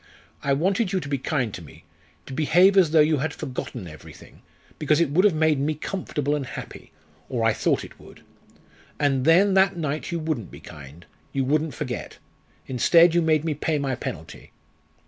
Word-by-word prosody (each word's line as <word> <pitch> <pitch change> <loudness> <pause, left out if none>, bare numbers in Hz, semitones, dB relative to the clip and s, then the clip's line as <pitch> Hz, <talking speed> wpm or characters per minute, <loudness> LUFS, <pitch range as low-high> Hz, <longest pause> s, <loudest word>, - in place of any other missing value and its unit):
I 140 - +1
wanted 190 - 0
you 190 - 0
to 145 - -7
be 140 -1 -2
kind 125 -6 -2
to - - -7
me, 75 - -15 0.4
to 135 - -9
behave 175 +7 +4
as 185 -5 +5
though 155 0 +5
you 155 0 +3
had 155 +4 -3
forgotten 125 -8 -6
everything, 80 -2 -14 0.4
because 150 0 +2
it 165 -4 +1
would 180 +6 +3
have 200 -6 +4
made 155 -2 +2
me 150 +3 -1
comfortable 150 -3 -3
and 145 - -3
happy; 125 - -9 0.4
or 120 -4 -2
I 115 -1 +3
thought - - 0
it - - -13
would. - - -16 0.8
And 135 -3 +1
then, 190 +5 +5
that 190 -2 +3
night 155 -1 -3
you 170 - -1
wouldn't 155 - -3
be - - -12
kind, 75 +4 -13 0.3
you 135 -1 0
wouldn't 155 +2 0
forget - - -6 0.5
instead, 165 +7 +4
you 175 - +3
made 160 -1 +1
me 160 - 0
pay 155 +1 -1
my 140 -2 -2
penalty." 80 -9 -8
150 Hz, 190 wpm, -24 LUFS, 135-165 Hz, 0.8 s, as